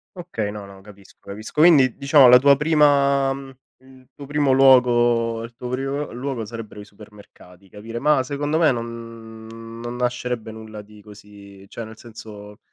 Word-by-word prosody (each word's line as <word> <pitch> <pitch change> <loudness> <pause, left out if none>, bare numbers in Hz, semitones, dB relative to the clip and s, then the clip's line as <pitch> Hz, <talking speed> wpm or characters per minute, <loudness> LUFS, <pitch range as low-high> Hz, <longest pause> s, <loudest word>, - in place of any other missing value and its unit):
Ok, 175 -7 -12
no, 105 -1 -9
no, 95 -1 -15
capisco 100 -1 -18
capisco. 110 +8 -4
Quindi 145 -7 +5
diciamo 140 -1 +5
la 125 0 +8
tua 140 +1 +4
prima 140 -3 +2
mhmm, 135 0 -10 0.2
il 130 0 -21
tuo 140 - -11
primo 145 -1 0
luogo 120 -3 +3
il 115 0 -11
tuo 125 +1 -8
primo 135 +3 -4
l - - -11
luogo 130 -3 -4
sarebbero 110 -1 -9
i - - -10
supermercati 100 -3 -18
capire 115 +4 -9
ma 150 +1 +2
secondo 145 +3 -3
me 160 -3 +3
non 115 -1 -9 0.3
non 120 +1 -6
nascerebbe 120 -2 -3
nulla 110 -1 -10
di 105 0 -17
così, 100 -2 -15
cioè 115 - -8
nel 110 0 -12
senso 105 -3 -13
120 Hz, 170 wpm, -21 LUFS, 110-135 Hz, 0.3 s, la